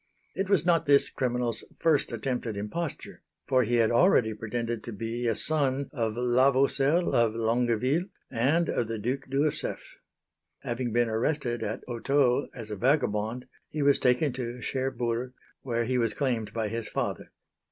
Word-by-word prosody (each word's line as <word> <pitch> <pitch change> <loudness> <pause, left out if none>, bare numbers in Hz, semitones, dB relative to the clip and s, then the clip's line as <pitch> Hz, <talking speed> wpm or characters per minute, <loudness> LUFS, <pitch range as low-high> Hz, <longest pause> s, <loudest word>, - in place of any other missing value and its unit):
It 195 0 -2
was 190 -6 +3
not 170 -4 +2
this 140 -1 +5
criminal's 125 -2 -1
first 160 -3 +2
attempt 125 +2 -3
at 110 -3 -4
imposture, 135 +10 -5 0.3
for 130 -1 +3
he 120 0 0
had 115 -1 +3
already 120 - +4
pretended 115 +1 -4
to 120 - -5
be 115 +3 -3
a 115 - +1
son 140 +1 +1
of 115 -4 -2
la 125 +2 +4
Vaucelle 140 +5 +2
of 115 -2 +3
Longueville 120 +7 +1 0.3
and 140 +8 +2
of 120 - -1
the 115 0 -3
Duc 130 +6 -3
d'Ursef. 140 +3 -2 0.7
Having 120 0 -2
been 120 +1 +2
arrested 120 +2 -1
at 105 - -4
Hottot 130 +2 +1
as 115 -4 -8
a - - -2
vagabond, 120 -1 0 0.2
he 150 -1 -2
was 140 0 +4
taken 125 +2 +2
to 125 -1 -5
Cherburg, 125 -1 -2 0.3
where 120 -2 -1
he 125 +1 0
was 115 -3 0
claimed 115 -6 -1
by 110 0 -2
his 115 +1 -4
father. - - -3
125 Hz, 165 wpm, -28 LUFS, 115-135 Hz, 0.7 s, this